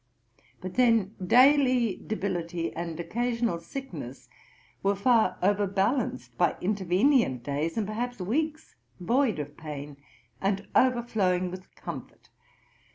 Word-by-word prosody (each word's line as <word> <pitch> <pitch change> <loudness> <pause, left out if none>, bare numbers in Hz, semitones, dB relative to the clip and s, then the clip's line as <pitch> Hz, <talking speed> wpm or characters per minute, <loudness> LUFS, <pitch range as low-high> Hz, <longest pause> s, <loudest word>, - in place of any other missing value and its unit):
But 185 0 -6
then 230 -5 +3
daily 255 -1 +5
debility 175 -5 -3
and 170 0 -5
occasional 235 0 -1
sickness 270 +11 -8 0.5
were 200 +1 +2
far 225 +3 +3
overbalanced 200 - 0
by 175 - +3
intervenient 195 - +2
days, 145 - -2
and, 220 - +1
perhaps, 235 +3 -4
weeks 305 - -2 0.3
void 230 - +1
of 145 -1 -6
pain, 145 -2 -7 0.4
and 195 +1 -1
overflowing 215 -8 +2
with 185 +1 -10
comfort. - - -9
200 Hz, 105 wpm, -28 LUFS, 175-240 Hz, 0.5 s, daily